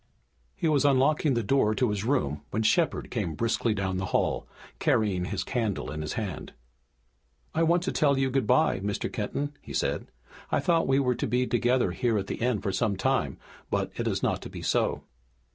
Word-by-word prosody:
He - - -1
was 150 -3 +3
unlocking 140 +1 +3
the 115 - 0
door 110 -1 +2
to 125 -3 +1
his 105 -1 -2
room 110 - 0
when 110 - -1
Shepard 160 +9 +1
came 95 -10 -2
briskly 115 +3 0
down 95 -2 -1
the 95 0 -2
hall, - - 0 0.3
carrying 95 -5 +1
his 95 -1 -2
candle 115 -6 -2
in 75 0 -4
his 75 - -3
hand. 100 -8 -5 1.0
"I 165 - +1
want 170 +1 +3
to 190 - -1
tell 140 -3 +2
you 135 -1 +1
good 135 0 0
bye, 155 -10 +3
Mr. 100 +1 -3
Kenton," 140 +6 -2
he - - -9
said, - - -1 0.4
"I - - +3
thought 165 -2 +2
we 135 0 +3
were 130 -2 +2
to 120 - -2
be 125 +3 +1
together 120 -4 +2
here 115 +3 0
at 100 - -1
the - - -4
inn 120 -4 +1
for 100 - -1
some 105 0 0
time, 130 +6 0 0.3
but - - -1
it - - -2
is - - -1
not - - 0
to - - -8
be - - -8
so." - - +1
120 Hz, 205 wpm, -28 LUFS, 100-135 Hz, 1.0 s, was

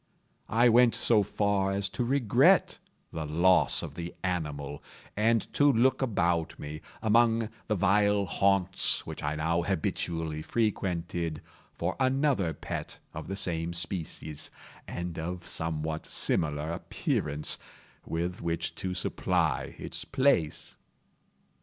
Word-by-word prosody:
I 120 +2 +4
went 120 0 +5
so 110 -3 +4
far 100 -1 0
as 100 0 +1
to 125 - -2
regret 125 -3 +3 0.3
the 80 - -3
loss 85 +5 +4
of - - -6
the 85 0 -6
animal, 75 -6 -3 0.3
and 115 +1 +2
to 145 0 +5
look 130 +3 +3
about 85 -9 0
me, 75 +1 -7 0.2
among 115 0 +3 0.2
the 110 - +1
vile 100 +2 +3
haunts 95 -1 +2
which - - -7
I 75 +1 -1
now 80 +2 +1
habitually 80 -3 -2
frequented, 85 -6 -1 0.4
for 85 +2 -2
another 130 - +2
pet 75 - -6 0.2
of - - -7
the 95 - -3
same 85 -3 -1
species, 85 -3 -5 0.4
and 85 -1 -5
of 90 +2 -5
somewhat 80 -1 -3
similar 75 0 0
appearance, 75 -2 -2 0.4
with 85 +2 -3
which 85 0 -2
to 90 -1 -3
supply 90 - 0
its - - -6
place. 130 - +1
90 Hz, 120 wpm, -29 LUFS, 80-105 Hz, 0.4 s, went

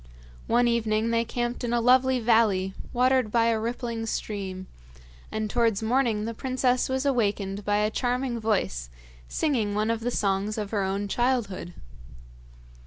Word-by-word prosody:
One 240 +1 +3
evening 225 -1 +1
they 230 0 +2
camped 240 +1 -3
in 240 -1 -1
a 240 - +3
lovely 255 +2 +4
valley 220 -5 +2 0.2
watered 255 -2 +2
by 230 0 +3
a 225 -1 +1
rippling 230 0 -3
stream, 190 -4 -4 0.7
and 215 0 -2
towards 225 -2 +1
morning 230 -3 +1
the 230 - -3
princess 255 +1 0
was 265 +1 -1
awakened 205 -6 0
by 205 0 +1
a 210 +1 +1
charming 245 0 -1
voice 185 - -1 0.4
singing 230 -10 0
one 215 +2 +1
of 230 - -1
the 235 +2 -2
songs 205 -1 0
of 210 -2 -4
her 205 -3 0
own 195 +1 -1
childhood. 205 -7 -1
225 Hz, 155 wpm, -26 LUFS, 205-245 Hz, 0.7 s, lovely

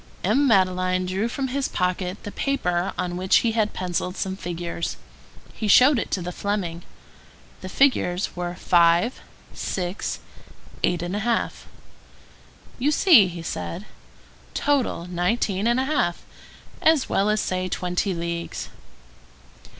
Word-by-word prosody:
M. 255 +9 +3
Madeleine 185 -3 +2
drew 190 +5 -1
from 265 +2 -3
his 275 +1 -1
pocket 180 +1 -2
the 205 - -6
paper 180 -11 -1
on 180 -1 -2
which 185 +1 +2
he 230 - +3
had 220 -2 +1
pencilled 180 0 -3
some 190 0 -2
figures. 170 -2 -4 0.6
He 215 - -3
showed 255 +5 +6
it - - -3
to 185 - -2
the 180 - -4
Fleming. 180 -4 -3 0.8
The 185 - -6
figures 200 -8 +1
were 175 0 -4
5, 175 +6 +3 0.3
6, 180 +1 -3 0.6
8½. 195 +7 0 1.3
"You 270 +4 +2
see," 300 - +6
he 170 -2 -7
said, 175 +3 -5 0.7
"total, 275 -11 0
nineteen 185 +3 0
and 240 +2 +2
a 260 - +1
half; 270 - 0 0.6
as 315 -4 +4
well 210 +2 +1
say 185 -3 -1
twenty 180 +2 -1
leagues." 170 0 -4
185 Hz, 125 wpm, -24 LUFS, 175-230 Hz, 1.3 s, showed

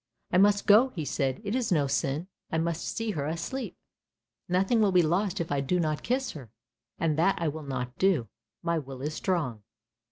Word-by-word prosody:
" - - -45
I 180 - +5
must 205 +1 +4
go," 220 +5 +6
he 160 -4 -3
said, 135 0 -1
"it 205 0 -2
is 250 -4 0
no 150 -5 +3
sin, 140 +4 -1 0.2
I 160 - 0
must 165 0 -1
see 225 -2 -2
her 145 -6 -2
asleep, 170 - -4 0.7
nothing 190 +6 +3
will 205 -2 +4
be 180 -1 +5
lost 190 +5 +1
if 170 -2 -3
I 140 -1 +1
do 180 +7 0
not 155 -3 0
kiss 260 +3 -1
her, 130 -7 -10 0.5
and 160 -2 0
that 195 +4 +4
I 165 - 0
will 155 +2 -6
not 130 -3 -4
do. 180 -12 +3 0.4
My 170 -1 +1
will 135 -2 -8
is 150 +1 -2
strong." 155 - -1
165 Hz, 210 wpm, -28 LUFS, 145-195 Hz, 0.7 s, go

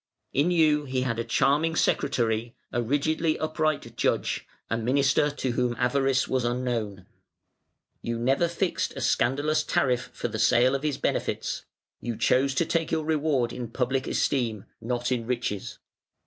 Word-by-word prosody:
In 145 +6 +3
you 155 -4 +3
he 130 -1 -1
had 115 -3 -1
a - - 0
charming 145 +7 +2
secretary, 115 -6 0 0.2
a 120 - 0
rigidly 155 +6 +1
upright 155 -1 -1
judge, - - 0 0.2
a - - -1
minister 135 +5 +2
to 140 -3 -2
whom 120 0 0
avarice 135 +2 +2
was 130 -2 0
unknown. 120 -6 -2 1.0
You 115 0 -3
never 135 +8 +2
fixed 170 +2 -1
a - - -5
scandalous 145 +6 +2
tariff 125 -4 0
for - - -3
the 110 -1 -5
sale 120 +3 +4
of 135 - -1
his 150 -2 -1
benefits; - - -2 0.3
you 120 -2 -4
chose 135 +1 +2
to 165 - +2
take 165 -2 0
your 160 -1 0
reward 150 -6 +1
in 120 -2 -5
public 130 +3 -1
esteem, 115 -7 0 0.2
not 120 +2 -2
in 120 -3 -1
riches. 120 -5 -3
130 Hz, 155 wpm, -26 LUFS, 120-150 Hz, 1.0 s, sale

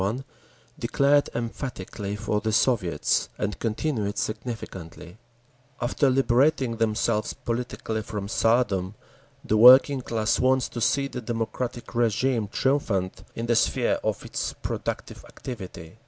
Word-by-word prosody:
1) 110 +8 -1 0.6
declared 140 +4 +3
emphatically 115 -4 -4
for 105 0 -1
the 110 +1 -1
Soviets, 105 -6 +1
and 105 -1 -3
continued 110 -2 -2
significantly, 105 -5 -6 0.6
After 130 +3 +1
liberating 130 -1 +2
themselves 110 -1 0
politically 115 -2 -3
from 105 -1 -5
Tsardom, 105 -3 +1 0.5
the 110 - +2
working 130 +4 +8
class 110 -3 0
wants 130 0 +2
to 120 - -6
see 140 +4 +2
the 125 - -6
democratic 120 +1 -3
régime 120 -1 0
triumphant 100 -9 0
in 115 - -3
the 120 0 +2
sphere - - +2
of - - -2
its - - -3
productive - - -5
activity. 95 -7 -9
115 Hz, 120 wpm, -25 LUFS, 105-125 Hz, 0.6 s, working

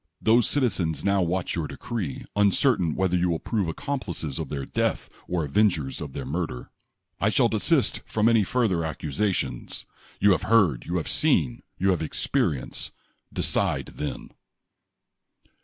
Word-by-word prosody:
Those 115 +1 +4
citizens 100 - 0
now 100 -1 +2
watch 90 +1 -1
your 80 -3 -2
decree, 95 - -5
uncertain 100 - +3
whether 95 -1 +1
you 90 0 +2
will 85 - +1
prove 105 +1 -1
accomplices 85 - -3
of - - -4
their 70 -2 -4
death - - -1 0.2
or 85 -3 -1
avengers 75 -3 +1
of 70 -3 -6
their 70 - -5
murder. 75 -3 -4 0.5
I - - +2
shall - - +3
desist - - +1
from 110 0 +1
any 115 -2 +5
further 100 -7 +1
accusations. 80 - -2 0.3
You 100 - +5
have 95 - +2
heard, 95 - +4
you 90 - -1
have 80 - -3
seen, 80 - +2 0.2
you 95 +1 +2
have 90 - 0
experienced. 75 -3 -1 0.4
Decide - - 0
then 75 - -5
90 Hz, 145 wpm, -26 LUFS, 75-105 Hz, 0.5 s, any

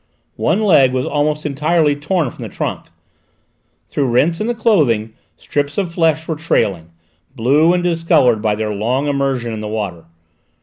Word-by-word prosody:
One 215 - +1
leg 140 -10 +4
was 130 0 -1
almost 150 +1 -1
entirely 150 +1 +1
torn 150 -1 -1
from - - -13
the - - -6
trunk. - - -4 1.0
Through 140 -3 -1
rents 160 - +1
in 215 - -1
the 240 - -1
clothing 145 - +1 0.2
strips 145 +3 -3
of 185 -4 -2
flesh 160 -2 +1
were 160 - -2
trailing, 100 - -1 0.5
blue 140 +7 +3
and 180 0 0
discoloured 165 -10 +2
by 105 -1 +1
their 105 0 -3
long 120 +7 -1
immersion 135 -5 -1
in 110 - -5
the 105 - -5
water. 100 -6 -4
145 Hz, 165 wpm, -17 LUFS, 115-165 Hz, 1.0 s, leg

